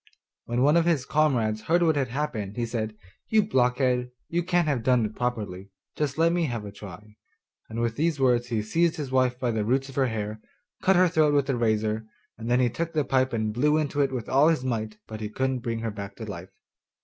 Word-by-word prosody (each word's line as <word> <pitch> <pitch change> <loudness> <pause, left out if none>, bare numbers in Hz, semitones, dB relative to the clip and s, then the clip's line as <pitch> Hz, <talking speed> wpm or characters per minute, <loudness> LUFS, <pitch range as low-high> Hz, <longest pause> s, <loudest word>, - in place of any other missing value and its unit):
When 120 +2 0
one 150 +4 +5
of 170 - +3
his 160 -7 +1
comrades 120 -9 +1
heard 170 +8 +2
what 160 -2 +3
had 135 -3 0
happened, 115 -6 -3
he 120 - 0
said, 110 -2 -4 0.3
'You 220 -1 +4
blockhead, 125 - +1 0.2
you 170 +1 0
can't 175 -1 +1
have 140 -5 0
done 125 -1 +3
it 105 - -6
properly; 105 -6 -3 0.3
just 145 -2 -2
let 165 +1 +4
me 175 -1 +1
have 115 -6 -4
a 100 - -7
try,' 105 +1 -12 0.5
and 110 +1 -5
with 115 -1 -1
these 160 -1 0
words 125 -2 +3
he 115 -3 -1
seized 165 +9 +1
his 145 -4 -5
wife 130 -1 +2
by 125 -2 0
the 110 -2 -1
roots 130 +5 0
of 135 - -11
her 135 -1 +3
hair, 110 -2 -4 0.4
cut 190 - +4
her 180 +1 +5
throat 155 -3 +3
with 140 -1 +2
a - - 0
razor, 110 -1 0 0.3
and 115 +1 -6
then 125 +1 +3
took 165 +7 -3
the 150 -3 +1
pipe 130 0 +2
and 110 -2 -1
blew 150 +6 +2
into 145 -2 0
it 135 -1 +1
with 125 -4 -4
all 140 +3 +4
his 160 -6 +2
might 110 -4 -3
but 110 0 -8
he 105 - -3
couldn't 130 +3 -1
bring 115 -1 -3
her 115 -1 -2
back 100 -1 -7
to 110 - -7
life. 95 -3 -7
125 Hz, 230 wpm, -26 LUFS, 110-145 Hz, 0.5 s, one